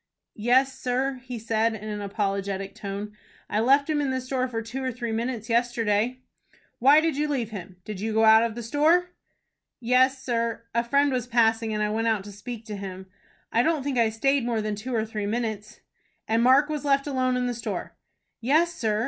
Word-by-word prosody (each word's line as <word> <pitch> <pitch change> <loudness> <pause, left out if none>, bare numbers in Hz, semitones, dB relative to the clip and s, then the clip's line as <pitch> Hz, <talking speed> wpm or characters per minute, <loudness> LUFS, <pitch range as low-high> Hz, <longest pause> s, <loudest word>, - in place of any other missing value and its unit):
"Yes, 260 +3 +3
sir," 255 +1 -1
he 250 -1 -5
said, 225 0 0
in 215 0 -8
an 210 -1 -4
apologetic 195 -1 -2
tone, 205 +1 -6 0.4
"I 210 - +1
left 275 +5 +4
him 305 -2 +1
in 280 - 0
the 260 0 -1
store 255 0 -2
for 230 -2 -4
two 255 +4 -5
or 260 - -1
three 235 -1 -4
minutes 230 0 -3
yesterday." 235 0 +1 0.6
"Why 280 +5 +6
did 320 -3 0
you 300 +1 +1
leave 250 -7 -2
him? 190 -3 -8
Did 210 -3 -6
you 220 +1 -2
go 220 +1 +3
out 220 0 +8
of 230 -1 -1
the 240 - -6
store?" 315 +8 +2 0.7
"Yes, 255 +2 +3
sir. 230 -2 -1
A 235 +1 +2
friend 280 +4 +2
was 250 -2 -2
passing, 225 -2 +2
and 210 0 -1
I 210 - 0
went 225 +1 0
out 220 -3 +1
to 205 - -9
speak 225 +3 -8
to 215 -2 -6
him. 190 -1 -8 0.4
I 230 - +3
don't 310 +1 +1
think 270 -3 -1
I 230 -1 +4
stayed 270 +5 +1
more 235 -2 0
than 215 0 -2
two 235 +5 -4
or 220 -1 +1
three 215 -2 -4
minutes." 215 -1 -4 0.5
"And 225 +1 +2
Mark 260 +4 +5
was 300 -1 -3
left 275 -1 +2
alone 255 -3 0
in 250 - 0
the 245 - -1
store?" 235 - -5 0.4
"Yes, 315 +8 +2
sir. 220 -8 -1
235 Hz, 210 wpm, -26 LUFS, 215-260 Hz, 0.7 s, out